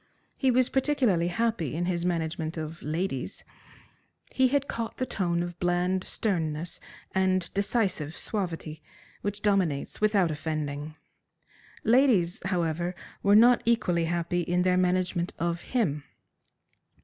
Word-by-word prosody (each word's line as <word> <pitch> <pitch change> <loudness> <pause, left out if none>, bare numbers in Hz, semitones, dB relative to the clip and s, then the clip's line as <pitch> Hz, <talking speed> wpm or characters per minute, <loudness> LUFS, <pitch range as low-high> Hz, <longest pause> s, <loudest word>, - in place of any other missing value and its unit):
He 265 - +1
was 255 0 +4
particularly 255 - +2
happy 175 - -1
in 175 +2 -1
his 175 -1 -1
management 160 -1 -2
of 160 +1 -5
ladies. 155 -2 -3 0.9
He 260 0 +3
had 280 +1 +1
caught 230 -1 -4
the 255 - -1
tone 175 -7 -1
of 175 0 -7
bland 180 +1 +1
sternness 165 -5 -2 0.3
and 185 -2 +1
decisive 195 -7 0
suavity 165 -6 -4 0.4
which 205 0 -4
dominates 190 -9 0
without 205 -5 +3
offending. 150 -1 -4 0.9
Ladies, 225 -8 +3
however, 175 -1 -1 0.3
were 200 +1 +5
not 240 +3 +7
equally 185 -8 +2
happy 170 +1 -1
in 175 +1 +1
their 180 0 +3
management 180 -1 +1
of 170 0 -1
him. 155 - -1
180 Hz, 125 wpm, -28 LUFS, 165-205 Hz, 0.9 s, not